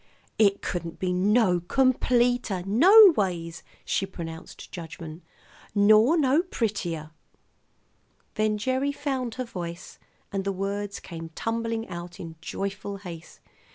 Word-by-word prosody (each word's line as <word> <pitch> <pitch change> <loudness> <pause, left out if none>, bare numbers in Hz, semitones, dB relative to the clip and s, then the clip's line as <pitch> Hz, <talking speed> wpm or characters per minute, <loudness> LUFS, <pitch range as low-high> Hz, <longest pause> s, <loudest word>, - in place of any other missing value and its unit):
"It 200 -2 +3
couldn't 170 -2 -4
be 185 -1 -1
no 195 0 +3
completer, 245 -1 +1
no 365 - +8
ways," 170 -4 -2 0.2
she 195 - 0
pronounced 165 -3 -9
judgment. 165 -1 -8 0.5
"Nor 215 +9 +5
no 285 +1 +3
prettier." 195 - -3 1.2
Then 215 -1 0
Gerry 260 +5 0
found 265 -5 -3
her 255 - -3
voice, 175 -6 -7 0.3
and 195 -1 -2
the 195 - -1
words 200 +1 -3
came 165 -2 -8
tumbling 230 0 -2
out 175 0 -8
in 165 -2 -8
joyful 200 +3 -4
haste. 170 -5 -10
200 Hz, 120 wpm, -26 LUFS, 175-240 Hz, 1.2 s, no